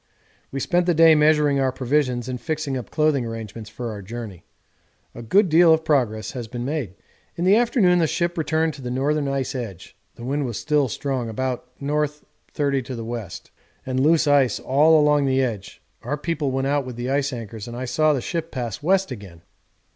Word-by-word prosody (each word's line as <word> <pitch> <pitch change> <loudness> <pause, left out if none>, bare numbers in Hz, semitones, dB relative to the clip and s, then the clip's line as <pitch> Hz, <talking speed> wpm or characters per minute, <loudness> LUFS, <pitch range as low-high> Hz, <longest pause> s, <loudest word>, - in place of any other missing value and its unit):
We 135 - -3
spent 175 +5 +1
the 175 - +3
day 165 0 +7
measuring 150 -2 +3
our 135 -1 +2
provisions 130 -1 0
and 125 -1 -5
fixing 155 -4 -2
up 125 -4 -5
clothing 150 -4 +1
arrangements 115 -2 -7
for 115 +2 -5
our 105 -1 -7
journey; 105 -3 -8 0.7
a 120 - -9
good 190 - +3
deal 165 +1 +6
of 160 - -7
progress 115 -7 0
has 120 -4 -6
been 120 +1 -5
made. 135 - -3 0.4
In 170 - -2
the 195 +2 +6
afternoon 220 -6 +3
the 165 - +3
ship 170 +2 -1
returned 160 -1 0
to 140 - -11
the 125 - -5
northern 140 +3 0
ice 135 0 -2
edge; 105 -9 -7 0.2
the 120 - -9
wind 140 +1 -1
was 115 - -4
still 150 -2 +1
strong 130 -1 -3
(about 125 +2 -3
N. 150 +2 0 0.4
30 140 -2 0
W.) 115 -3 -5 0.6
and 130 0 -1
loose 160 +4 +4
ice 140 -4 +3
all 155 +4 +4
along 150 -1 +3
the 135 0 +2
edge 105 -6 -5 0.2
our 145 +5 -3
people 150 -2 -2
went 135 0 -1
out 140 +1 +1
with 125 -2 -7
the 120 +2 -3
ice 140 0 +1
anchors 115 -2 -7
and 120 0 -7
I 130 - -3
saw 155 +5 +2
the 140 -4 0
ship 165 +4 -3
pass 120 -4 -5
west 190 +1 +2
again. 95 -8 -10
135 Hz, 200 wpm, -23 LUFS, 120-155 Hz, 0.7 s, day